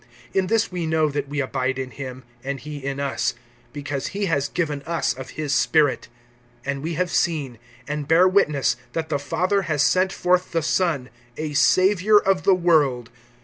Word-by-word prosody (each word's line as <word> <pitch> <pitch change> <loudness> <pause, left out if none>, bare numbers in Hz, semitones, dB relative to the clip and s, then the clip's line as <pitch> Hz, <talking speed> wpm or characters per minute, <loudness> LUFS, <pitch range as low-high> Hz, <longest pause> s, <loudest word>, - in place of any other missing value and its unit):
(13)In 190 -1 +1
this 225 0 +1
we 175 -3 -3
know 160 -1 +2
that 145 -1 -3
we 145 0 -3
abide 130 -1 -1
in 130 -1 -4
him, 130 -2 -8 0.2
and 135 0 -4
he 150 -2 -8
in 140 0 -3
us, 140 -1 -1 0.4
because 145 -2 -4
he 205 - 0
has 140 -6 0
given 150 -5 -2
us 170 -1 0
of 130 0 -9
his 150 -2 -1
Spirit. 150 -4 +2 0.6
(14)And 140 0 -2
we 165 +2 -3
have 180 +1 -1
seen, 140 -8 -1 0.3
and 150 -1 -3
bear 170 +4 +5
witness, 150 -10 +2 0.2
that 160 -1 -3
the 145 -2 0
Father 185 +7 0
has 150 -2 +2
sent 185 +5 +3
forth 180 -1 +1
the 165 -1 +1
Son, 155 -6 0 0.3
a 155 -1 -4
Savior 190 +6 +4
of 195 -2 +2
the 195 - +6
world. 150 -9 +2
150 Hz, 185 wpm, -23 LUFS, 140-180 Hz, 0.6 s, the